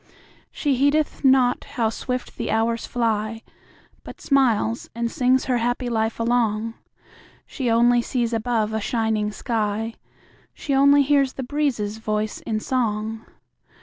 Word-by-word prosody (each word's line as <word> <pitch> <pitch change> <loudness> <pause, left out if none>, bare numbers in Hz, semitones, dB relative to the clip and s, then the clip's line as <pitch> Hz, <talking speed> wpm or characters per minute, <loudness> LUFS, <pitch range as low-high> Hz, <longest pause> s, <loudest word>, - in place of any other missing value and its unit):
She 290 -3 0
heedeth 290 +4 +1
not 260 -2 +4
how 230 -3 -1
swift 250 +2 -4
the - - -3
hours 225 +1 0
fly, 225 -1 -1 0.6
But - - -11
smiles 240 -5 +1
and 235 0 -2
sings 255 +1 +2
her 250 -2 +1
happy 245 +1 -1
life 225 -1 -1
along; 230 -1 0 0.7
She 260 -4 -3
only 240 +1 +4
sees 235 -1 -2
above 225 -1 0
a 220 - -1
shining 220 -2 0
sky; 220 0 -2 0.6
She 280 - -3
only 280 +1 +5
hears 275 -1 +2
the 265 - -5
breezes' 245 -7 -1
voice 215 -1 -2
in 220 -1 0
song. 220 -2 -2
235 Hz, 135 wpm, -23 LUFS, 220-255 Hz, 0.7 s, only